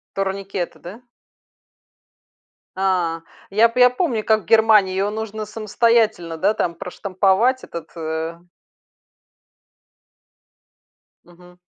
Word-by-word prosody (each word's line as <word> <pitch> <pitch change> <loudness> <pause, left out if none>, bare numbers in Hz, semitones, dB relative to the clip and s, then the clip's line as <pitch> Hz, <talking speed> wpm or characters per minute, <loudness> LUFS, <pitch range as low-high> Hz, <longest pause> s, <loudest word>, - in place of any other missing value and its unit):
Турникеты, 195 -2 -3
да? 190 +7 -11 1.8
А. 180 -4 0 0.3
Я 220 +4 +4
п 250 +2 -3
я 250 - +7
помню, 250 -5 -1
как 220 -2 +2
в - - -23
Германии 220 -2 +4
её 195 +2 -1
нужно 215 0 -5
самостоятельно, 215 -5 +1
да, 200 +6 +1
там, 170 -1 -1
проштамповать 195 +8 0
этот, 165 -1 -9
э 160 +1 -4 2.9
Мгм. 180 0 -19
195 Hz, 95 wpm, -21 LUFS, 175-220 Hz, 2.9 s, я